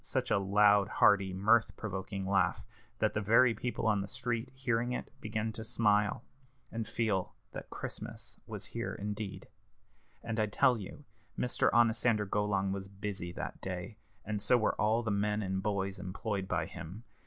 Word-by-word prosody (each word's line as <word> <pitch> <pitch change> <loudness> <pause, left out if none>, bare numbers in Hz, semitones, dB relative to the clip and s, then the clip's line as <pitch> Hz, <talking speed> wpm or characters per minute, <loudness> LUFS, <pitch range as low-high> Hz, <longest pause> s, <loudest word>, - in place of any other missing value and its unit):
such - - -2
a - - +5
loud, 100 0 +5
hearty, 95 -2 +4
mirth 110 +5 +3
provoking 95 -1 -4
laugh, 95 -1 +1 0.3
that - - +1
the 105 - 0
very 115 +4 +5
people 120 -1 -3
on 105 -3 +3
the 100 - -4
street, 120 +1 -3
hearing 120 -2 0
it, - - -5
began 110 0 -2
to 110 - -6
smile, 105 -1 +2 0.5
and 115 -2 -3
feel 105 -5 -1 0.2
that - - -8
Christmas - - -7
was - - -6
here - - -4
indeed. 105 0 -5 0.8
And 115 -1 -2
I 105 - +2
tell 115 +3 +3
you 105 +8 -9 0.3
Mr. 125 - +2
Onosander 115 -2 +3
Golong 100 -1 0
was 95 0 -4
busy 100 -3 -5
that 65 -3 -6
day, 95 +3 -5 0.3
and 105 0 -2
so 115 +4 +4
were 110 - +2
all 110 +3 +3
the 110 - -1
men 105 +1 +1
and 95 0 -1
boys 100 -1 -1
employed 95 +1 -3
by - - 0
him. 90 +8 -8
105 Hz, 165 wpm, -32 LUFS, 95-115 Hz, 0.8 s, a